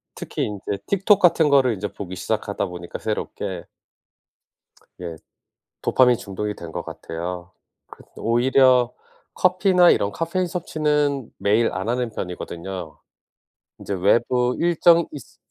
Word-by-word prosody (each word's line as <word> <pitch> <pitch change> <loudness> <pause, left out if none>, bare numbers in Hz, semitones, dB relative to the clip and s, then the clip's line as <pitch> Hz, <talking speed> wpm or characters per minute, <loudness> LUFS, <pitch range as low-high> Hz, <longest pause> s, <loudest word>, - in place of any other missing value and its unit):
특히 - - -3
인제 100 -1 -4
틱톡 200 +1 +3
같은 160 -4 +4
거를 130 -4 +4
인제 105 0 -4
보기 95 -2 -7
시작하다 90 - -2
보니까 90 -1 -7
새롭게. - - -4 1.4
예. 85 -2 -5 0.7
도파민 125 -2 +4
중독이 105 +1 -4
된 85 -1 -9
것 - - -5
같아요. 90 +1 -6 0.4
그 - - -15
오히려 125 +1 +3 0.4
커피나 185 -1 +4
이런 100 0 +2
caffeine 175 +2 -1
섭취는 150 - -1
매일 110 +3 +2
안 95 +4 -3
하는 120 -1 0
편이거든요. 90 -2 -6 0.8
인제 100 - -5
외부 120 +6 +2
일정 170 0 +4
있으 145 - -11
120 Hz, 285 characters per minute, -22 LUFS, 95-155 Hz, 1.4 s, 같은